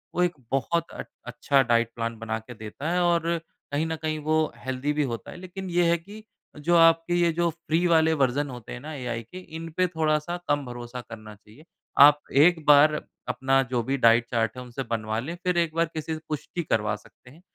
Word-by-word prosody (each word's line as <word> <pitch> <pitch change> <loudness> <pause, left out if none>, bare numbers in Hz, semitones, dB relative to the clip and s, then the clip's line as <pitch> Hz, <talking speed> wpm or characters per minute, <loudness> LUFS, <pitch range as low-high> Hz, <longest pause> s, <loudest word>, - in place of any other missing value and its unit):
वो 180 - +3
एक 175 -1 +1 0.2
बहुत 165 +5 0
अट - - -7 0.2
अच्छा 135 +3 +2
डाइट 115 -2 +2
प्लान 115 0 -3
बना 110 -1 -3
के 115 +3 -11
देता 110 +7 -6
है 180 0 +1
और 170 -1 +2 0.4
कहीं 145 +3 0
न 160 - -2
कहीं 155 -1 -1
वो 155 +1 +1 0.2
हेल्थी 130 +3 -2
भी 150 0 +1
होता 120 -4 -5
है। 185 - -10
लेकिन 185 +1 -7
यह 175 -1 +2
है 170 - +3
कि 205 +6 -12 0.3
जो 170 +4 +1
आपके 165 +1 +5
ये 170 -1 +3
जो 170 +1 +1
फ्री 170 +1 -1
वाले 160 -1 +4
वर्ज़न 135 +3 +1
होते 125 -3 -8
हैं 125 - -7
ना 155 +3 -7
एआई 125 -5 -4
के, 120 +11 -12
इन 165 -2 -8
पे 185 0 +3
थोड़ा-सा 160 0 -1
कम 145 -1 +1
भरोसा 120 0 -7
करना 110 -2 -10
चाहिए। 105 +9 -19 0.3
आप 145 +1 +9
एक 160 +3 +4
बार 150 +1 +7 0.3
अपना 130 +2 +2
जो 125 -2 +1
भी 135 +4 -1
डाइट 115 -1 +5
चार्ट 115 0 0
है 125 - -6
उनसे 125 +2 -6
बनवा 110 -1 -2
लें, 155 +9 -5
फिर 180 -1 +1
एक 165 -2 +1
बार 165 0 +3
किसी 160 0 -4
से 155 - -5
पुष्टि 155 +3 -4
करवा 110 -7 0
सकते 105 +3 -18
हैं 155 +7 -17
145 Hz, 220 wpm, -26 LUFS, 120-165 Hz, 0.4 s, आप